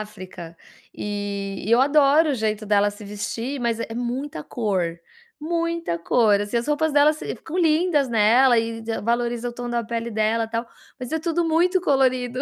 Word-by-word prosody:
África 185 -5 -9 0.4
e 200 -1 -4
e - - -2
eu 235 +2 +5
adoro 290 +2 +4
o - - 0
jeito 215 -2 -2
dela 205 0 +3
se 205 +1 -12
vestir, 230 +6 -4
mas 235 -2 -1
é 225 - -5
muita 245 - -4
cor, 185 -7 -2 0.4
muita 335 - -2
cor, 205 +3 +3
assim, 205 +3 -3
as 235 - -4
roupas 300 +1 +1
dela 295 +1 +5
se 305 - -6
ficam 330 - -8
lindas 320 -4 +2
nela 235 +3 +5
e 225 0 -3
e 225 - -2
valoriza 235 +1 -1
o - - -6
tom 245 0 -5
da 235 0 0
pele 230 +1 -4
dela 220 +1 0
tal, 230 +1 -3 0.3
mas 250 - -6
é 320 - 0
tudo 335 +1 -1
muito 355 +4 +2
colorido 255 -5 +1
235 Hz, 185 wpm, -23 LUFS, 215-290 Hz, 0.4 s, eu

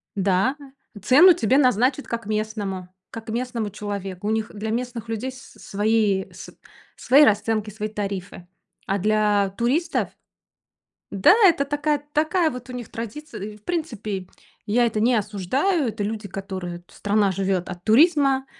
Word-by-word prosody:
Да, 195 +5 +1 0.5
цену 290 - +7
тебе 255 -2 +2
назначат 255 +1 +2
как 230 -2 -4
местному, 210 -3 -3 0.2
как 225 -1 -8
местному 235 -2 -2
человеку. 200 -2 -5
У - - +1
них 220 0 -1
для 215 +1 -4
местных 240 -1 -4
людей 225 +4 -3
с 260 +1 -14
свои, 205 -1 0
с - - -10 0.5
свои 280 +3 +5
расценки, 215 -1 +2
свои 215 +1 -5
тарифы. 200 -4 -5 0.4
А 195 - +1
для 210 0 +2
туристов. 295 +8 0 1.0
Да, 200 - +5
это 335 -6 +5
такая, 290 +1 0
такая 315 +2 +2
вот 250 -2 -8
у - - -7
них 245 -3 -7
традиция. 235 +2 -7
И, 210 +1 -7
в 210 - -27
принципе, 215 - -4 0.4
я 235 +3 +2
это 220 -2 -1
не 240 +3 +3
осуждаю. 230 - 0
Это 215 -1 -4
люди 210 0 -4
которые, 185 -3 -6
страна 205 -1 0
живет 190 -1 -1
от 180 -1 -8
туризма. 275 +1 +4
220 Hz, 150 wpm, -23 LUFS, 200-255 Hz, 1.0 s, цену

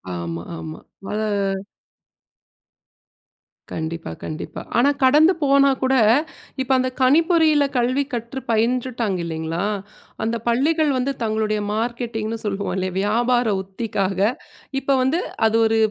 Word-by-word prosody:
ஆமா, 85 -1 -4 0.2
ஆமா. 80 0 -7 0.3
அத 215 +1 -1 2.5
கண்டிப்பா, 160 - -4
கண்டிப்பா. 155 - -6 0.2
ஆனா 265 +4 +5
கடந்து 305 +7 +6
போனா 275 0 +5
கூட 260 +1 +2 0.7
இப்ப 260 +1 -2
அந்த 255 0 +1
கனிப்பொறியில 315 +2 +4
கல்வி 255 +4 +2
கற்று 235 +3 -4
பயின்றுட்டாங்க 230 -3 0
இல்லீங்களா? 165 +2 -3 0.6
அந்த 230 +1 0
பள்ளிகள் 295 +5 +2
வந்து 265 +2 0
தங்களுடைய 215 -1 0
மார்க்கெட்டிங்ன்னு 230 -1 -3
சொல்லுவோம் 200 -1 -2
இல்லையா? 185 -1 -2
வியாபார 240 +3 +2 0.2
உத்திக்காக 195 -1 -2 0.6
இப்ப 275 0 +2
வந்து 285 +7 +1 0.3
அது 220 - 0
ஒரு 225 0 +2
235 Hz, 110 wpm, -22 LUFS, 200-265 Hz, 2.5 s, கடந்து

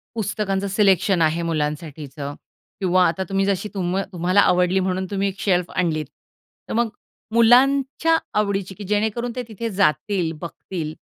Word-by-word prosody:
पुस्तकांचं 200 -2 -1
सिलेक्शन 195 -2 +3
आहे 160 +1 +2
मुलांसाठीचं 150 -3 -4 0.5
किंवा 185 -1 +3
आता 175 +3 -1
तुम्ही 195 0 +1
जशी 200 +1 -1
तुम 185 -1 -1
तुम्हाला 180 +3 +3
आवडली 180 +1 +3
म्हणून 185 0 -1
तुम्ही 200 0 0
एक 195 0 -5
शेल्फ 180 -3 +1
आणलीत. 160 -4 0 0.6
तर - - -3
मग 235 0 +1 0.4
मुलांच्या 270 +7 +4 0.2
आवडीची, 195 -2 -1
की 205 - -8
जेणेकरून 220 +4 -1
ते 250 - -3
तिथे 230 +1 -4
जातील, 180 -1 +1
बघतील, 165 -2 -6
190 Hz, 140 wpm, -22 LUFS, 170-210 Hz, 0.6 s, मुलांच्या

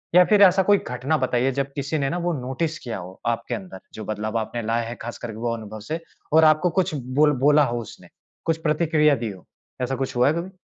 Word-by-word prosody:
या 180 - +9
फ़िर 210 +1 +4
ऐसा 190 0 +6
कोई 205 +2 +5
घटना 130 +2 -2
बताइए 130 0 +1
जब 140 - -5
किसी 140 +2 -2
ने 135 - 0
ना 175 - -2
वो 175 0 -1
नोटिस 145 +6 -2
किया 120 -3 -5
हो 90 +1 -10
आपके 115 +1 -1
अंदर 95 -2 -9
जो 110 - -7
बदलाव 110 +1 -3
आपने 115 +2 -3
लाया 115 +1 0
है 120 - -5
ख़ास 120 +1 -6
करके 110 -3 -7
वो 115 0 -1
अनुभव 110 -1 -8
से। 160 +2 -1 0.3
और 160 0 +7
आपको 155 +3 +4
कुछ 175 -4 0
बोल 140 +3 +2
बोला 150 0 +6
हो 120 -2 -2
उसने? 105 -5 -12 0.4
कुछ 165 -1 +1
प्रतिक्रिया 150 -1 +3
दी 115 -3 -3
हो? 95 -2 -13 0.4
ऐसा 125 +1 -1
कुछ 135 0 -3
हुआ 125 +1 +4
है 145 - +3
कभी? 170 +3 -4
130 Hz, 235 wpm, -23 LUFS, 115-155 Hz, 0.4 s, या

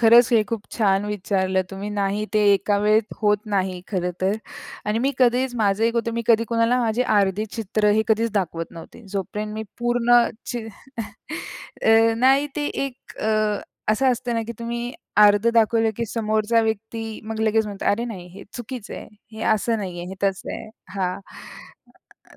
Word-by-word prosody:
खरंच 235 +1 +7
हे 225 - +5
खूप 225 -3 -2
छान 200 -3 +2
विचारलं 190 -2 0
तुम्ही. 195 +2 -5
नाही 200 +1 0
ते 210 - +4
एका 200 +1 +2
वेळेत 215 +1 +2
होत 210 -1 +3 0.2
नाही 185 -2 0
खरं 180 -3 -1
तर 190 +2 +2 0.5
आणि 210 +2 +1
मी 280 - +1
कधीच 250 0 +3
माझं 205 +2 +2
एक 230 - +1
होतं. 230 0 0
मी 235 - -1
कधी 230 -1 +4
कोणाला 230 +1 +2
माझी 230 +1 +1
अर्धे 205 -2 +2
चित्र 210 -1 +1
हे - - +4
कधीच 225 +1 +2
दाखवत 170 -4 -1
नव्हते. 170 +7 -12
जोपर्यंत 210 +2 -4
मी 220 - -3 0.2
पूर्ण 240 0 +4 0.2
चि 235 -3 -4 1.2
अ, 225 0 +5
नाही 270 +4 +4
ते 295 -1 0 0.2
एक 260 -2 -9
अ, 215 -1 +1 0.3
असं 255 +5 +3
असतं 245 0 -3
ना 230 - 0
की 235 - -4
तुम्ही 235 +1 -4 0.3
अर्ध 210 +2 +6
दाखवलं 225 0 +4
की 235 - -1
समोरचा 220 +1 +1
व्यक्ती 220 0 -3
मग 220 0 -4
लगेच 220 0 +2
म्हणतो 200 -1 -6
अरे, 230 +4 0
नाही 195 -7 -7
हे 200 - -10
चुकीचं 240 -2 -7
आहे. - - -8 0.2
हे 220 0 -7
असं 225 +2 0
नाहीये. 180 -4 -5
हे 190 - -6
तसं 195 -1 -1
आहे. - - -7 0.3
हां. 185 -1 -1 1.1
अ, - - -18
220 Hz, 175 wpm, -23 LUFS, 200-235 Hz, 1.2 s, खरंच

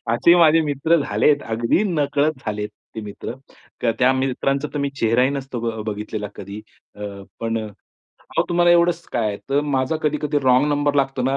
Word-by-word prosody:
असे 170 +8 +5
माझे 165 -1 +6
मित्र 150 +3 +1
झालेत, 145 -1 +2
अगदी 115 - 0
नकळत 150 -4 +1
झालेत 105 0 -2 0.3
ते 110 - -4
मित्र. 105 +2 -7 0.6
त्या 130 +1 +4
मित्रांचा 135 +2 -1
तर - - -1
मी 140 -1 -1
चेहराही 120 +4 +3
नसतो 135 -3 -4
ब 115 -2 -3
बघितलेला 105 0 -4
कधी. 100 +2 -8 0.3
अ, - - -15 0.4
पण 115 0 -1 0.7
अहो, - - +1
तुम्हाला 175 0 +3
एवढंच 175 0 +3
काय 115 -2 0
आहे? 100 - -3
तर 140 +1 +3
माझा 140 0 0
कधी-कधी 150 0 0
रॉन्ग 130 +2 +4
नंबर 145 0 +1
लागतो 135 -2 0
ना, 135 +2 +1
135 Hz, 170 wpm, -21 LUFS, 115-150 Hz, 0.7 s, माझे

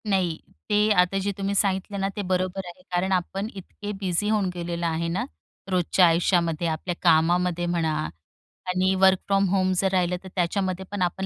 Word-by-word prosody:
नाही. 180 -5 +1 0.3
ते 210 0 +3
आता 180 +2 0
जे 200 +1 -1
तुम्ही 200 0 -2
सांगितले 195 0 +1
ना, 195 0 0
ते 205 - -2
बरोबर 185 +1 -1
आहे, 175 +1 -11
कारण 180 +2 0
आपण 190 +2 -1
इतके 205 +2 -7
बिझी 185 +2 0
होऊन 210 -3 +1
गेलेलो 170 -1 -4
आहे 165 +1 -1
ना, - - -1 0.5
रोजच्या 180 0 +3
आयुष्यामध्ये, 170 -1 +1
आपल्या 165 +2 -3
कामामध्ये 175 +1 +3
म्हणा 170 -2 0 0.8
आणि 185 +1 +2
वर्क 190 0 +5
फ्रॉम 195 0 +3
होम 185 0 +2
जर 190 +1 +2
राहिलं 180 -1 +1
तर - - -9
त्याच्यामध्ये 185 +1 -1
पण 205 -2 -4
आपण 180 +2 -1
185 Hz, 175 wpm, -25 LUFS, 175-195 Hz, 0.8 s, वर्क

